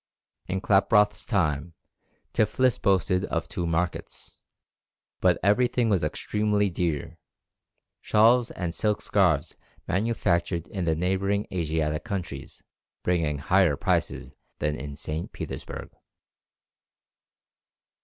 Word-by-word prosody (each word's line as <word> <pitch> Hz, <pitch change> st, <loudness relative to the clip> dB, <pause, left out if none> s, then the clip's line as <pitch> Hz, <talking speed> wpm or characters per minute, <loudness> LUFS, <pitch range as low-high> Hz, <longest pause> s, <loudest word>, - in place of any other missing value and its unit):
In 95 Hz, +1 st, -2 dB
Klaproth's 105 Hz, +1 st, +3 dB
time 80 Hz, -5 st, -1 dB, 0.6 s
Tiflis 125 Hz, +3 st, +2 dB
boasted 95 Hz, -1 st, +2 dB
of 85 Hz, -, -2 dB
two 90 Hz, -3 st, -3 dB
markets, 85 Hz, +1 st, -3 dB, 0.8 s
but -, -, +3 dB
everything 120 Hz, +3 st, +3 dB
was 95 Hz, -5 st, +2 dB
extremely 105 Hz, -1 st, 0 dB
dear, 85 Hz, -5 st, -2 dB, 0.8 s
shawls 115 Hz, +3 st, +4 dB
and 85 Hz, -2 st, -4 dB
silk 105 Hz, +2 st, 0 dB
scarves 90 Hz, -8 st, +1 dB, 0.3 s
manufactured 85 Hz, -5 st, 0 dB
in 95 Hz, -4 st, -3 dB
the 80 Hz, -1 st, +2 dB
neighbouring 95 Hz, +4 st, 0 dB
Asiatic 80 Hz, -3 st, -1 dB
countries 90 Hz, -11 st, -6 dB, 0.4 s
bringing 80 Hz, -5 st, +1 dB
higher 90 Hz, +2 st, +3 dB
prices -, -, -1 dB, 0.2 s
than 75 Hz, 0 st, -1 dB
in 70 Hz, 0 st, -7 dB
St. 75 Hz, +2 st, -5 dB
Petersburg. -, -, -7 dB
90 Hz, 100 wpm, -26 LUFS, 80-105 Hz, 0.8 s, shawls